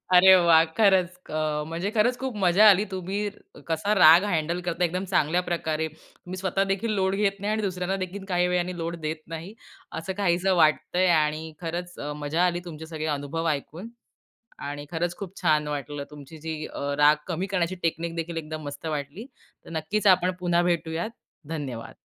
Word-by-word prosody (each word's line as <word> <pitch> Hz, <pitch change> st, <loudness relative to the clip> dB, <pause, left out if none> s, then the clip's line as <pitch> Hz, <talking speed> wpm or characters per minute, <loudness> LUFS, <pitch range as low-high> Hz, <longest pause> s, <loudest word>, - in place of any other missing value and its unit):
अरे 190 Hz, +1 st, +9 dB
वाह! 165 Hz, -1 st, +7 dB
खरंच 190 Hz, -5 st, +4 dB, 0.2 s
क -, -, -12 dB
अ, 155 Hz, -1 st, -1 dB
म्हणजे 170 Hz, +4 st, -2 dB
खरंच 245 Hz, +4 st, +3 dB
खूप 265 Hz, -3 st, -4 dB
मजा 195 Hz, +5 st, +7 dB
आली 200 Hz, +1 st, +4 dB
तुम्ही 190 Hz, +2 st, -3 dB, 0.2 s
क 145 Hz, -, -19 dB
कसा 165 Hz, +6 st, 0 dB
राग 165 Hz, +3 st, +8 dB
हँडल 170 Hz, +2 st, -1 dB
करता 175 Hz, +1 st, 0 dB
एकदम 180 Hz, +3 st, -2 dB
चांगल्या 175 Hz, 0 st, +2 dB
प्रकारे. 160 Hz, -2 st, -1 dB
तुम्ही 175 Hz, +3 st, -12 dB
स्वतः 190 Hz, +1 st, 0 dB
देखील 205 Hz, +4 st, -1 dB
लोड 190 Hz, +1 st, +1 dB
घेत 200 Hz, -1 st, 0 dB
नाही 205 Hz, +2 st, -2 dB
आणि 220 Hz, -, -1 dB
दुसऱ्यांनादेखील 190 Hz, 0 st, -3 dB
काही 180 Hz, 0 st, +3 dB
वेळाने 180 Hz, 0 st, -1 dB
लोड 170 Hz, 0 st, -3 dB
देत 155 Hz, 0 st, -3 dB
नाही, 170 Hz, +6 st, -8 dB, 0.5 s
असं 190 Hz, +4 st, -4 dB
काहीसं 185 Hz, +1 st, +2 dB
वाटतंय 175 Hz, +4 st, +2 dB
आणि 155 Hz, +1 st, -2 dB
खरंच 175 Hz, +1 st, -4 dB
अ, 145 Hz, -, -4 dB
मजा 160 Hz, +5 st, +1 dB
आली 175 Hz, -1 st, 0 dB
तुमचे 160 Hz, -2 st, -8 dB
सगळे 155 Hz, -1 st, -5 dB
अनुभव 160 Hz, +4 st, -3 dB
ऐकून 155 Hz, +8 st, -4 dB, 0.8 s
आणि 145 Hz, 0 st, -5 dB
खरंच 175 Hz, +1 st, -2 dB
खूप 195 Hz, -1 st, -8 dB
छान 155 Hz, -3 st, +2 dB
वाटलं 145 Hz, 0 st, -4 dB
तुमची 150 Hz, +2 st, -11 dB
जी 160 Hz, -, -2 dB, 0.2 s
अ, -, -, -6 dB, 0.2 s
राग 150 Hz, +1 st, +6 dB
कमी 180 Hz, +2 st, -2 dB
करण्याची 180 Hz, 0 st, 0 dB
टेकनिकदेखील 165 Hz, 0 st, -2 dB
एकदम 155 Hz, 0 st, -5 dB
मस्त 145 Hz, +2 st, -7 dB
वाटली. 150 Hz, -, -4 dB, 0.4 s
तर -, -, -12 dB
नक्कीच 205 Hz, +7 st, -1 dB
आपण 180 Hz, 0 st, -1 dB
पुन्हा 175 Hz, -1 st, +2 dB
भेटूयात. 165 Hz, +4 st, -2 dB, 0.4 s
धन्यवाद. 135 Hz, -8 st, -5 dB
170 Hz, 175 wpm, -26 LUFS, 155-185 Hz, 0.8 s, अरे